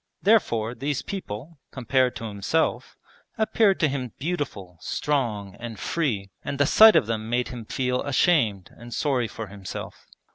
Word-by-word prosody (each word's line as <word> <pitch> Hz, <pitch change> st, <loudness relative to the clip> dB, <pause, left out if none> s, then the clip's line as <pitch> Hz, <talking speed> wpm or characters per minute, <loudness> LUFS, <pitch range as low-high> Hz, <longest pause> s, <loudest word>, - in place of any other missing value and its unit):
Therefore 120 Hz, -, +3 dB
these 140 Hz, +3 st, -2 dB
people, 155 Hz, -, -6 dB
compared 130 Hz, 0 st, +1 dB
to -, -, -7 dB
himself, 110 Hz, +9 st, -1 dB, 0.4 s
appeared 220 Hz, -3 st, +3 dB
to 155 Hz, -, +5 dB
him 130 Hz, -5 st, -4 dB
beautiful, 130 Hz, -, -4 dB
strong, 110 Hz, -9 st, -1 dB
and 115 Hz, -3 st, -7 dB
free, 110 Hz, -12 st, -1 dB
and 140 Hz, -, -4 dB
the 145 Hz, -, +4 dB
sight 220 Hz, +9 st, +8 dB
of -, -, +5 dB
them 110 Hz, 0 st, -3 dB
made 120 Hz, +1 st, 0 dB
him 120 Hz, -3 st, -7 dB
feel 125 Hz, +2 st, -1 dB
ashamed 125 Hz, -, +2 dB
and 120 Hz, -1 st, -9 dB
sorry 130 Hz, -6 st, +1 dB
for 110 Hz, +1 st, -6 dB
himself. 100 Hz, -2 st, -8 dB
125 Hz, 150 wpm, -25 LUFS, 110-145 Hz, 0.4 s, sight